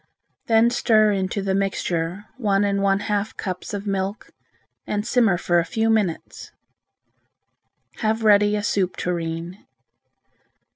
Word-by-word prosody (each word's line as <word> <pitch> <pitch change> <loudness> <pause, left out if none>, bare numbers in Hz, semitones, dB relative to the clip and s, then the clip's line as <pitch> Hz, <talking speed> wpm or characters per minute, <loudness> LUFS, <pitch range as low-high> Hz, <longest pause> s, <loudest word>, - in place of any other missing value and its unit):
Then 230 +1 +4
stir 215 -3 +3
into 195 0 -2
the 195 -1 0
mixture 190 -1 -2
one 205 -5 +1
and 200 -1 0
a 195 0 +3
half 210 0 -2
cups 185 -2 -5
of 205 0 -5
milk 195 +1 -3 0.6
and 210 0 -2
simmer 230 -6 +3
for 175 0 +2
a - - +1
few 225 +5 0
minutes. 205 -7 -2 1.5
Have 220 0 -1
ready 205 -1 +4
a 210 - -2
soup 190 -4 0
tureen. 170 +1 -4
200 Hz, 130 wpm, -22 LUFS, 185-215 Hz, 1.5 s, Then